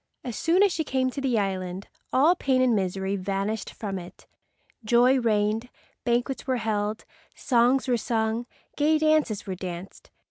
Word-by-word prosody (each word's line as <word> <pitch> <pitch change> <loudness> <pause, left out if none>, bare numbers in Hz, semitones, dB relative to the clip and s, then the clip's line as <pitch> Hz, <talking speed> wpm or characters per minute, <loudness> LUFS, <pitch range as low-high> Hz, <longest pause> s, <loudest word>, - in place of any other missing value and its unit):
As 245 -3 -5
soon 350 +4 +3
as 400 -3 +3
she 320 - -1
came 260 -3 0
to 275 - -5
the 255 -4 +1
island 190 -2 -2 0.2
all 295 +7 +5
pain 265 -6 +1
and 255 -3 +3
misery 190 0 -1
vanished 195 +3 -2
from 195 -3 -5
it. 175 0 -12 0.6
Joy 245 +4 +4
reigned. 220 0 0 0.4
Banquets 245 +3 -1
were 260 -1 +1
held, 215 -1 -2 0.3
songs 255 +1 +2
were 245 -2 +2
sung, 225 0 -1 0.3
gay 305 +2 +3
dances 310 -9 +1
were 190 - -3
danced. 180 0 -8
235 Hz, 155 wpm, -26 LUFS, 200-260 Hz, 0.6 s, all